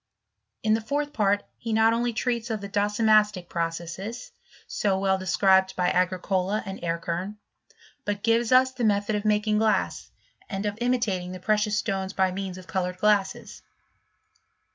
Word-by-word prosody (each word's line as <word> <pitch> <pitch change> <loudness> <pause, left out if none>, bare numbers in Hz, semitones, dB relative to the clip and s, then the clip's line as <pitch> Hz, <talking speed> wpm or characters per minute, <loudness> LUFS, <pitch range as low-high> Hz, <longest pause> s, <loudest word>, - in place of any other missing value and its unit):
In 215 0 +3
the 225 - +1
fourth 290 +5 -2
part 205 -1 +1 0.2
he 230 -1 -3
not 220 +1 +4
only 240 +1 0
treats 235 +1 -2
of 220 -2 -2
the 200 - -6
docimastic 210 -2 +2
processes, 170 +7 -4 0.3
so 195 -2 0
well 190 0 +1
described 190 0 +3
by 180 -1 +1
Agricola 185 +2 0
and 195 0 -7
Erckern, 170 +3 -3 0.7
but 205 -3 -3
gives 230 +1 +2
us 260 +1 +5
the 260 -2 -5
method 205 0 +1
of 205 0 -3
making 210 0 +2
glass, 220 -1 0 0.4
and 195 -1 -3
of 205 -1 -1
imitating 215 -8 0
the 185 - -7
precious 210 +2 +1
stones 195 -3 -2
t)y 190 -1 +2
means 190 -1 -5
of 185 - -11
coloured 180 -1 -2
glasses. 200 -1 0
205 Hz, 155 wpm, -26 LUFS, 190-220 Hz, 0.7 s, us